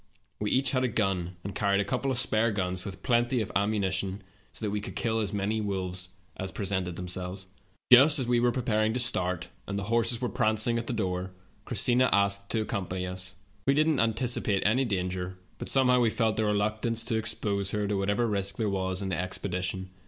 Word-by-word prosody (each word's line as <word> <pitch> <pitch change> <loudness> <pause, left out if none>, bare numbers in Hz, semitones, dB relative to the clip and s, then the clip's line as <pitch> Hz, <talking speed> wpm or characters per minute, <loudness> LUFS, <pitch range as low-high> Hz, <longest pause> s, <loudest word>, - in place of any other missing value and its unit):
We 105 - 0
each 135 +2 +3
had 130 -1 +1
a - - +3
gun, 95 -6 -1
and 100 - -5
carried 100 0 +1
a 100 - +1
couple 130 +5 -1
of 130 - 0
spare 115 -2 +2
guns 90 -3 -2
with 95 -1 -7
plenty 120 +1 +2
of 110 - -3
ammunition, 100 -1 0 0.3
so 110 - -6
that 105 - -1
we 105 0 -2
could - - -7
kill 115 -1 0
as 105 -3 -1
many 105 +2 -1
wolves 95 -2 -3 0.3
as 95 0 -4
presented 95 -3 -2
themselves. 90 +1 -5 0.5
"Just 140 +5 +9
as 130 - 0
we 120 0 +2
were 120 0 +3
preparing 110 -3 0
to 125 - -1
start, 90 -7 +1 0.2
and 100 - -3
the 100 - -2
horses 115 0 +2
were 125 - -1
prancing 115 -1 +1
at 115 - -6
the - - -1
door, 95 -4 -2 0.3
Christina 125 +1 +2
asked 100 0 +1
to 110 - 0
accompany 95 -4 -3
us. 90 0 -4 0.3
We 135 - +4
did 155 +2 +3
not 115 -8 +2
antici 120 +1 +2
pate 100 -3 +1
any 125 +6 +3
danger, 90 -3 -2 0.2
but - - -4
somehow 125 -2 +4
we 120 -2 +3
felt 110 -1 0
a - - +2
reluc 105 +1 0
tance 115 -1 0
to 115 0 -2
expose 105 -3 -1
her 105 0 -1
to 105 - 0
whatever 100 +4 +1
risk 100 -3 -1
there 110 -3 0
was 95 0 -1
in 95 - -3
the 90 - -1
expedition. 95 0 -3
105 Hz, 215 wpm, -28 LUFS, 95-115 Hz, 0.5 s, Just